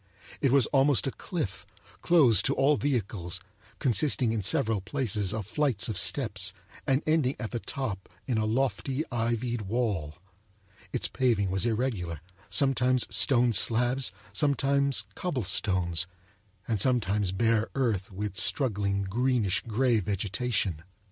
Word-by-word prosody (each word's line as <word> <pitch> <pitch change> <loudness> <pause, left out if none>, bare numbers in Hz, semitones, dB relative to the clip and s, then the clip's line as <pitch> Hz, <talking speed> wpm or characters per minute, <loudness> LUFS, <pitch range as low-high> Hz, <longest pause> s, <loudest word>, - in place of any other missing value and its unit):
It 135 - +2
was 135 -3 +5
almost 135 -1 +4
a 135 - -1
cliff, 140 - -5 0.4
closed 145 -10 +4
to 135 - +1
all 140 +3 +3
vehicles, 100 -11 -2 0.4
consisting 130 -2 +1
in 110 -2 -1
several 110 - +1
places 105 -3 -1
of 110 -2 -4
flights 125 -5 0
of 110 - -3
steps, 100 -9 0 0.3
and 135 +1 +2
ending 155 -4 +1
at 110 - -5
the 120 - -3
top 110 -8 -5 0.2
in 120 -4 0
a 110 - 0
lofty 135 +4 -1
ivied 120 0 -1
wall. 100 -8 -2 0.8
Its - - -2
paving 115 -7 0
was 95 +5 +1
irregular, 110 - -2 0.3
sometimes 130 -3 +2
stone 120 +4 +4
slabs, 120 +5 +2 0.2
sometimes 140 -3 +1
cobblestones, 95 - -1 0.6
and 110 -4 0
sometimes 105 -6 +1
bare 110 +2 +1
earth 110 -9 -1
with 100 0 -5
struggling 100 -5 +2
greenish 115 0 0
grey 120 +1 +2
vegetation. 100 -2 -1
115 Hz, 130 wpm, -28 LUFS, 100-135 Hz, 0.8 s, was